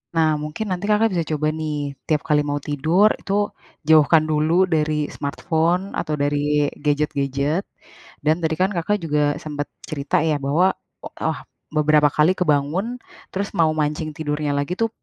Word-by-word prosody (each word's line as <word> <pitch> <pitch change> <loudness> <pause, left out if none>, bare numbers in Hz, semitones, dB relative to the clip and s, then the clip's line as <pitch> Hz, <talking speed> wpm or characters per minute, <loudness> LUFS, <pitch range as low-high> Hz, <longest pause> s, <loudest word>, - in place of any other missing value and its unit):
Nah, 160 -1 +4
mungkin 155 +9 -4
nanti 185 +1 -2
Kakak 215 +2 +3
bisa 170 -2 0
coba, 150 0 0
nih. 145 -3 -3
Tiap 155 -2 +1
kali 150 -1 +4
mau 145 0 -1
tidur, 160 +9 +3
itu 195 - -3 0.6
jauhkan 155 0 +6
dulu 155 +1 +1 0.2
dari 155 0 +1 0.2
smartphone 160 +5 0 0.2
atau 155 - -3
dari 145 0 +1 0.5
gadget-gadget. 145 +2 0 0.6
Dan 155 +1 +4
tadi 160 0 +1
kan 190 - +3
Kakak 175 +5 0
juga 150 -1 +1 0.2
sempet 145 -1 -4 0.2
cerita 140 -2 -2
ya, 150 - +2
bahwa 165 +7 +3 0.4
o - - -5
ah, - - -2 0.4
beberapa 150 -1 +4
kali 155 +4 +5
kebangun, 155 +3 +1 0.5
terus 200 +1 -2
mau 160 -1 +4
mancing 150 +1 -1
tidurnya 150 -1 -2
lagi 145 +5 -1
tuh, 225 - +2
155 Hz, 155 wpm, -22 LUFS, 145-170 Hz, 0.6 s, jauhkan